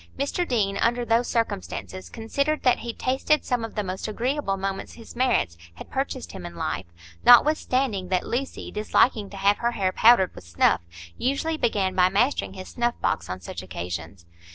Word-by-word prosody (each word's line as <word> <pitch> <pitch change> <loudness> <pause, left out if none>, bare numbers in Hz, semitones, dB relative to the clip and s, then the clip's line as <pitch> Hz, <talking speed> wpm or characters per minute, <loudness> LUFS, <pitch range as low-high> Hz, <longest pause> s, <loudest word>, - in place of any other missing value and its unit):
Mr 285 +6 -1
Deane, 200 -5 0
under 240 +2 +1
those 230 +1 +2
circumstances, 200 -4 -3
considered 280 +7 -1
that 250 - +4
he 235 - -4
tasted 265 +6 0
some 245 -3 0
of 225 - -6
the 210 - -1
most 185 +1 -4
agreeable 235 -1 -1
moments 195 0 -4
his 230 0 -12
merits 235 - +1 0.2
had - - -11
purchased 265 -1 -3
him 190 -2 -8
in 175 0 -8
life, 80 +4 -3 0.4
notwithstanding 250 -6 +4
that 185 -1 0
Lucy, 270 +3 -4
disliking 210 0 +2
to 200 - -10
have 200 +1 +3
her 235 0 0
hair 190 -4 0
powdered 220 -3 +5
with - - -11
snuff, 85 0 +2 0.4
usually 280 +5 0
began 205 -9 0
by 180 0 +4
mastering 235 +9 +1
his 185 0 -9
snuff 240 0 -1
box - - -1
on 90 0 -4
such 85 0 -7
occasions. 85 -1 -6
220 Hz, 175 wpm, -25 LUFS, 185-250 Hz, 0.4 s, powdered